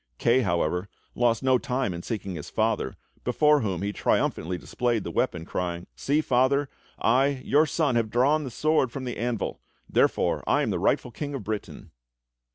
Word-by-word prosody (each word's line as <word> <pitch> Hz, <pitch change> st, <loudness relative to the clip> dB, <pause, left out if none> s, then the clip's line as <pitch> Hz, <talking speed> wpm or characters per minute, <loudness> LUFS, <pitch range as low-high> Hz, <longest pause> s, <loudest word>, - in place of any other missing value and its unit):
Kay, 120 Hz, +2 st, +3 dB
however, 90 Hz, -1 st, 0 dB, 0.2 s
lost 120 Hz, 0 st, +1 dB
no 130 Hz, -1 st, +4 dB
time 125 Hz, -7 st, -1 dB
in 85 Hz, -, -6 dB
seeking 100 Hz, -1 st, -4 dB
his 75 Hz, -4 st, -7 dB
father, 110 Hz, -1 st, 0 dB, 0.3 s
before 150 Hz, +4 st, +4 dB
whom 95 Hz, -5 st, -2 dB
he 100 Hz, 0 st, -2 dB
triumphantly 90 Hz, -2 st, 0 dB
displayed 120 Hz, +2 st, -1 dB
the -, -, -5 dB
weapon, 80 Hz, -1 st, -1 dB
crying; 85 Hz, -1 st, -3 dB
"See, 145 Hz, +3 st, +1 dB
Father, 135 Hz, +1 st, +2 dB, 0.3 s
I, 130 Hz, +3 st, +2 dB
your 150 Hz, +3 st, +4 dB
son, 150 Hz, -2 st, +1 dB
have 115 Hz, -2 st, +1 dB
drawn 140 Hz, +7 st, +3 dB
the 135 Hz, -, -4 dB
sword 150 Hz, 0 st, +1 dB
from 135 Hz, 0 st, -5 dB
the 125 Hz, -1 st, -4 dB
anvil; 115 Hz, -, -2 dB, 0.3 s
therefore -, -, +1 dB
I -, -, +3 dB
am -, -, 0 dB
the -, -, -1 dB
rightful 125 Hz, -, +1 dB
King 145 Hz, +4 st, -5 dB
of 130 Hz, -, -5 dB
Britain!" 105 Hz, 0 st, -6 dB
120 Hz, 175 wpm, -26 LUFS, 100-135 Hz, 0.3 s, no